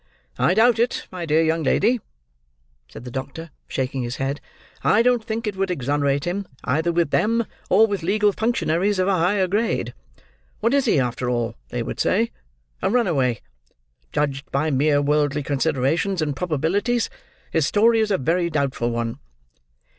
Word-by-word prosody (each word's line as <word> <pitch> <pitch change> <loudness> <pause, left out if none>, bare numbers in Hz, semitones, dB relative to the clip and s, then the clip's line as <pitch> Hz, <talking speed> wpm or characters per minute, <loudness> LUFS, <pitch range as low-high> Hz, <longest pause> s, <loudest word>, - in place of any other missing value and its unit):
"I 180 - +3
doubt 230 +1 +4
it, 240 +1 0
my 175 -2 -5
dear 155 +2 +3
young 160 +1 +1
lady," 220 - +2 0.9
said 110 - -11
the 125 - -8
doctor, 140 +5 -6 0.2
shaking 130 0 -2
his 120 0 -3
head. 135 +1 -3 0.4
"I 225 - +4
don't 245 -2 +2
think 225 0 -3
it 210 -2 -2
would 195 0 -1
exonerate 140 -2 0
him, 190 +2 -3 0.2
either 160 +6 +1
with 170 -3 0
them, 230 +2 +2 0.2
or 210 +4 +6
with 200 -4 -3
legal 205 +4 +2
functionaries 205 -3 0
of 185 0 +1
a 200 - +3
higher 190 +3 +2
grade. 200 - -1 0.7
What 230 +4 +1
is 280 -1 +3
he, 215 - +3
after 125 0 -1
all, 120 -1 -1 0.2
they 120 -1 -3
would - - -6
say? 225 +4 +1 0.5
A - - +1
runaway. 140 - +1 0.7
Judged 140 -1 -2
by 150 +3 0
mere 145 +1 +2
worldly 145 0 +1
considerations 145 +7 0
and 150 -3 -1
probabilities, 180 - 0 0.4
his 160 -3 +2
story 225 +2 +4
is 220 -1 +1
a 195 - +2
very 170 +5 0
doubtful 140 -6 -1
one." 115 +2 -3
165 Hz, 165 wpm, -22 LUFS, 140-205 Hz, 0.9 s, or